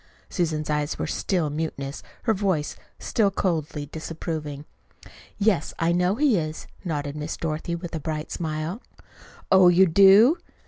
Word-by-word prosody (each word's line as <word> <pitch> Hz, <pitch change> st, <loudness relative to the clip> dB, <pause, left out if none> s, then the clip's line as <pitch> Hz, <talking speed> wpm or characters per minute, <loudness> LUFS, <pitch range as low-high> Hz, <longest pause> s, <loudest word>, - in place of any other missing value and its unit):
Susan's 155 Hz, -4 st, -1 dB
eyes 150 Hz, 0 st, -1 dB
were -, -, -2 dB
still 170 Hz, -6 st, -1 dB
mutinous, 145 Hz, -2 st, -4 dB, 0.2 s
her 225 Hz, -, +2 dB
voice 190 Hz, -7 st, -1 dB, 0.2 s
still 210 Hz, -3 st, +1 dB
coldly 160 Hz, -6 st, -2 dB
disapproving. 155 Hz, -1 st, -6 dB, 0.7 s
"Yes, 200 Hz, -6 st, +1 dB
I 165 Hz, +1 st, +1 dB
know 180 Hz, +3 st, +2 dB
he 270 Hz, -4 st, +3 dB
is," 155 Hz, 0 st, -5 dB, 0.2 s
nodded 145 Hz, -5 st, -3 dB
Miss 150 Hz, +1 st, -4 dB
Dorothy 160 Hz, +1 st, -3 dB
with 170 Hz, 0 st, -7 dB
a 160 Hz, -, -2 dB
bright 155 Hz, +1 st, -4 dB
smile. 160 Hz, +6 st, -3 dB, 0.7 s
"Oh, 190 Hz, -1 st, +7 dB
you 175 Hz, +2 st, +6 dB
do!" 200 Hz, -, +6 dB
165 Hz, 140 wpm, -25 LUFS, 155-190 Hz, 0.7 s, Oh